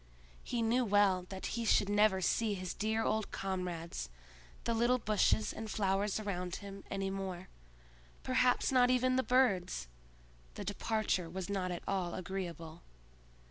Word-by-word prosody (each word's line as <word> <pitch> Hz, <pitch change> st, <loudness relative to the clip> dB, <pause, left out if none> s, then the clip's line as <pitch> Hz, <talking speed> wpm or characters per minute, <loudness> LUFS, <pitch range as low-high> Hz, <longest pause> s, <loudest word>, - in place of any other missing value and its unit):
He 235 Hz, -2 st, -1 dB
well 205 Hz, -5 st, +3 dB
knew 180 Hz, -, -15 dB
that 190 Hz, -1 st, -6 dB
he 235 Hz, -, -2 dB
should 215 Hz, -2 st, +3 dB
never 205 Hz, -2 st, +3 dB
see 215 Hz, +2 st, +1 dB
his 185 Hz, -2 st, -4 dB
dear 220 Hz, +2 st, 0 dB
old 220 Hz, -1 st, 0 dB
comrades, 175 Hz, -, -4 dB, 0.5 s
the 235 Hz, -, 0 dB
little 240 Hz, +2 st, +3 dB
bushes 215 Hz, -1 st, +2 dB
and 220 Hz, 0 st, -6 dB
flowers 200 Hz, 0 st, 0 dB
around 180 Hz, -4 st, -3 dB
him, 200 Hz, -1 st, -8 dB
any 195 Hz, -1 st, -2 dB
more; 190 Hz, -2 st, -5 dB, 0.7 s
perhaps 255 Hz, 0 st, +2 dB
not 250 Hz, -1 st, +5 dB
even 255 Hz, 0 st, +3 dB
the 260 Hz, -, +3 dB
birds! 200 Hz, -, +2 dB, 0.7 s
The 205 Hz, -, -6 dB
departure 205 Hz, -3 st, -1 dB
was 190 Hz, +2 st, -5 dB
not 190 Hz, -2 st, -1 dB
at 175 Hz, -1 st, -4 dB
all 185 Hz, -3 st, -1 dB
agreeable. 175 Hz, -3 st, -5 dB
200 Hz, 145 wpm, -34 LUFS, 185-225 Hz, 0.7 s, not